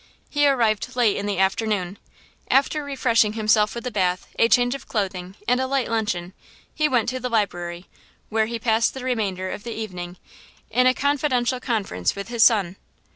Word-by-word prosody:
He 290 -1 +3
arrived 245 -2 +1
late 235 -5 +3
in 200 - -3
the 200 -2 -1
afternoon. 195 0 0 0.5
After 280 +3 +2
refreshing 230 -6 +2
himself 215 0 +2
with 235 - -6
a 250 - -2
bath, 185 -3 0
a 230 - +5
change 245 0 +4
of 275 - -8
clothing 190 -3 -3
and 250 +1 +2
a 260 - -1
light 270 -1 0
luncheon, 185 -5 -2 0.4
he 305 -1 +1
went 245 -5 +1
to 255 +1 -3
the 250 0 -3
library, 175 -5 -2 0.4
where 220 0 +1
be 235 +1 -3
passed 225 +1 +1
the 265 - -6
remainder 200 -7 -2
of 205 - -7
the 235 -1 -5
evening 180 -5 -6 0.5
in 250 +3 +4
a 255 - +4
confidential 265 -3 +1
conference 205 - -1
with 200 +2 -6
his 235 -2 +3
son. 200 -5 +3
225 Hz, 180 wpm, -23 LUFS, 195-250 Hz, 0.5 s, a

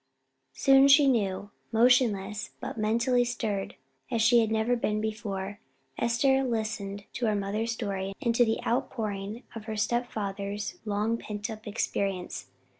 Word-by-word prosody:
Soon 270 - +6
she 280 +1 +7
knew. 205 -6 +1 0.2
Motionless, 225 -4 +3
but - - -5
mentally 235 +3 +2
stirred 215 -5 -3 0.3
as 235 -3 0
she 235 +1 +6
had 225 -2 +2
never 220 +2 +1
been 215 -3 0
before, 205 -2 -4 0.4
Esther 265 +3 +3
listened 215 -4 -3
to 240 - -1
her 215 - +2
mother's 210 +3 -1
story, 195 -4 -3
and 235 - +1
to 240 - +5
the 225 -1 0
outpouring 220 -3 -2
of 225 -2 -8
her 220 -1 -4
step 240 +3 0
father's 200 -1 -4
long 215 +2 0
pent 210 +2 -5
up 215 0 -9
experience. 195 -3 -2
220 Hz, 145 wpm, -28 LUFS, 205-235 Hz, 0.4 s, she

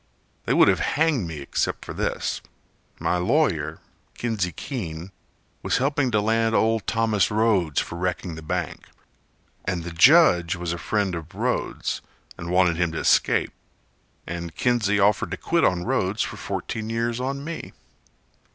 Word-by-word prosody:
They - - +1
would - - +6
have - - +3
hanged 150 - +1
me 80 -3 -6
except 70 - -2
for - - -6
this: - - -2 0.6
My 90 - +1
lawyer, 90 - +1 0.4
Kinsey 110 -7 -1
Keene, 85 - -6 0.5
was - - +1
helping 140 +1 +1
to 105 -3 +2
land 115 +1 +1
Old 110 -1 +2
Thomas 110 -4 +2
Rhodes 105 -8 +2
for 85 - -4
wrecking 90 -1 -2
the 80 - -8
bank, 75 - -4 0.8
And 90 -2 -2
the 85 - -6
judge 90 - +5
was 85 -1 -3
a 85 - -5
friend 100 +2 0
of 85 -2 -7
Rhodes - - -2 0.3
And 85 - -7
wanted 90 -2 +3
him 85 -1 +1
to - - -4
escape, - - +2 0.7
And 85 -2 -6
Kinsey 110 -4 +1
offered 100 +1 +3
to - - -4
quit - - +1
on 90 -1 +2
Rhodes 95 +3 0
For - - -5
fourteen 110 0 -4
years 115 +1 -1
for 130 +2 -2
me. 155 +4 -6
100 Hz, 155 wpm, -24 LUFS, 85-115 Hz, 0.8 s, would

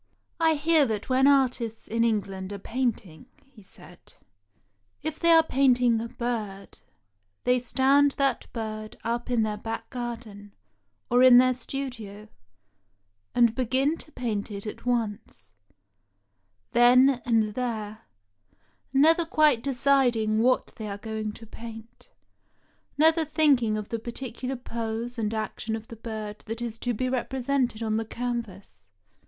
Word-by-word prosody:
" - - -47
I 320 - +3
hear 305 -1 +3
that 215 0 -4
when 260 +1 +4
artists 250 -5 +1
in 230 +1 0
England 195 -4 -1
are 200 - -5
painting," 225 -7 -3 0.2
he 270 -5 -19
said, 190 - -15 0.9
"if 315 0 -4
they 335 - +2
are 325 -1 +7
painting 250 -5 +3
a 230 - -4
bird, 215 -6 -5 0.6
they 250 0 +3
stand 275 +3 +3
that 275 -3 -1
bird 215 -1 -6
up 235 +2 -2
in 240 -3 +2
their 210 -1 -2
back 225 +1 -5
garden, 225 -5 -7 0.6
or 245 +1 +5
in 255 -1 +8
their 255 0 +5
studio, 230 -5 -6 1.1
and 235 -2 +4
begin 260 +5 +1
to 310 - -9
paint 220 -7 -3
it 200 0 -7
at 215 - -7
once, 210 - -3 1.2
then 250 +2 +5
and 220 -3 +1
there, 220 -3 -4 0.9
never 315 +5 +4
quite 305 -6 +3
deciding 245 -5 +2
what 255 +2 +1
they 220 - -5
are 200 - -5
going 215 0 -4
to 225 - -12
paint, 225 0 -11 0.9
never 320 +2 +4
thinking 280 -8 +2
of 210 -1 -6
the 230 - -3
par 235 +1 -7
ticular 255 0 -5
pose 230 +1 -4
and 215 -1 -1
action 220 0 -3
of 220 0 -9
the 230 - -8
bird 215 -2 -6
that 225 +1 -4
is 235 -2 -5
to 245 - -1
be 255 - -2
repre 255 +1 -2
sented 245 -4 0
on 215 0 0
the 225 - -2
canvas. 220 - -6
235 Hz, 145 wpm, -26 LUFS, 220-260 Hz, 1.2 s, in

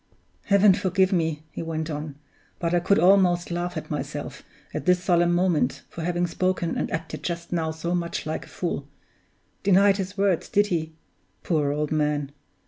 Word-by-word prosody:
"Heaven 200 -1 +6
forgive 190 +1 +1
me!" 160 -3 0
he - - -6
went 160 -1 -3
on, 150 -2 -5 0.4
"but 170 0 -1
I 175 - +4
could 190 +3 +2
almost 180 -1 +4
laugh 175 0 -2
at 155 - -6
myself, - - -5 0.3
at - - -4
this 180 0 +3
solemn 175 0 +3
moment, 175 -2 +1
for 170 - -7
having 175 +1 0
spoken 175 0 -1
and - - -1
acted 160 0 -4
just 170 0 -4
now 165 -2 0
so 160 +2 -3
much 170 -1 -2
like 155 - -4
a - - -16
fool! 165 -5 -3 0.7
Denied 195 0 +5
his 195 +1 -4
words, 195 -4 +1
did 205 +1 +3
he? 160 -1 -2 0.5
Poor 150 -4 +1
old 150 0 -2
man! 150 -2 0
175 Hz, 175 wpm, -25 LUFS, 160-185 Hz, 0.7 s, Heaven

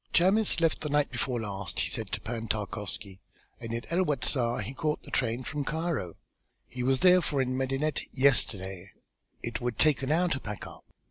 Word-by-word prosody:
"Chamis 195 +3 +4
left 165 -1 +2
the 150 - -3
night 145 0 +2
before 125 -3 -1
last," 100 -4 -4
he - - 0
said - - -3
to - - -2
Pan 115 0 -4
Tarkowski, 105 -2 -4 0.4
"and 115 -1 -6
in 115 0 -3
El 180 +2 +3
Wasta 130 -6 +1
he 120 +7 -6
caught 150 +2 -2
the - - -12
train 120 0 0
from 145 +2 -3
Cairo; 155 - -2 0.5
he 125 - -6
was 130 +1 +2
therefore 180 -6 +5
in 130 -1 0
Medinet 135 +3 0
yesterday. 100 -8 +2 0.5
It 115 0 -3
would 120 -3 -2
take 150 -3 +4
an 135 +2 -1
hour 175 +3 +3
to 135 - -1
pack 105 -4 -6
up. - - -12
130 Hz, 190 wpm, -29 LUFS, 115-150 Hz, 0.5 s, therefore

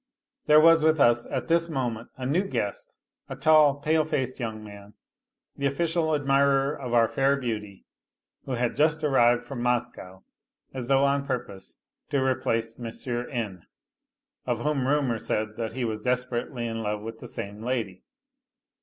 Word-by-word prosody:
There 150 0 +7
was 165 0 +6
with 160 0 +3
us 120 -2 +4
at - - -3
this 170 0 +2
moment 120 -6 -3
a 130 - -5
new 150 +8 +2
guest, - - -4 0.3
a - - -5
tall, 155 -3 +5
pale 155 +2 +1
faced 130 -4 -2
young 110 -3 -4
man, 100 0 -12 0.6
the 140 - 0
official 160 +2 0
admirer 140 0 +2
of 125 -3 -6
our 115 -1 +5
fair 135 +4 +2
beauty, 105 -6 -5 0.6
who 135 - -4
had 120 -1 -1
just 155 +2 +2
arrived 120 -4 +3
from 135 -4 -6
Moscow 115 -6 -2 0.5
as 130 -2 -5
though 135 0 +3
on 140 0 +1
purpose 120 -7 -5 0.3
to 140 - 0
replace 115 -3 -1
N., 120 - -5 0.8
of 120 -2 -1
whom 145 -3 0
rumour 135 -5 +1
said 110 0 -2
that 115 -1 -3
he 125 0 -2
was 110 -1 -3
desperately 125 0 -2
in 115 -1 -3
love 105 -1 -2
with 115 +1 -8
the - - -8
same 100 +1 -7
lady. 115 -6 -3
125 Hz, 160 wpm, -26 LUFS, 115-145 Hz, 0.8 s, There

